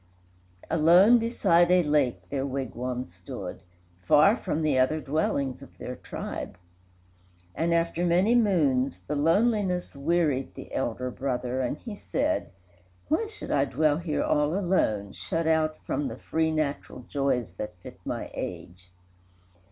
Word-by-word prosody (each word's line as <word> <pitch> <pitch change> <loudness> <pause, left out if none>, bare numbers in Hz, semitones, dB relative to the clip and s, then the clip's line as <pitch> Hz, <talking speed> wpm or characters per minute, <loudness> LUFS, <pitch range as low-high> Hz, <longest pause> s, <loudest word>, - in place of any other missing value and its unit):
Alone, 175 +9 +6
beside 190 -7 +3
a 180 0 +5
lake, 145 -5 +1
their 135 -2 -1
wigwam 130 -2 -3
stood, 90 +1 -8 0.4
Far 150 - +5
from 160 - -2
the 145 -4 +2
other 130 +5 +2
dwellings 140 -3 -1
of - - -14
their - - -6
tribe; - - -6 1.0
And, 165 +1 0
after 170 0 +1
many 180 +6 +3
moons, 155 - +2
the 150 - -3
loneliness 180 +3 +1
Wearied 145 -2 0
the - - -10
elder 125 0 -2
brother, 130 -1 -2
and 130 +3 -2
he 225 -4 -8
said, 295 +8 -1 0.6
"Why 435 +8 +1
should 425 - -8
I 140 -1 +3
dwell 150 +1 +2
here 165 -3 -1
all 150 +4 +1
alone, 110 - 0
shut 165 -3 -3
out 160 -1 +2
From 145 - -1
the - - -6
free, 160 0 0
natural 150 -4 -3
joys 135 -7 0
that 105 -3 -5
fit - - -11
my - - -4
age? 90 +1 -7
150 Hz, 140 wpm, -27 LUFS, 130-175 Hz, 1.0 s, Alone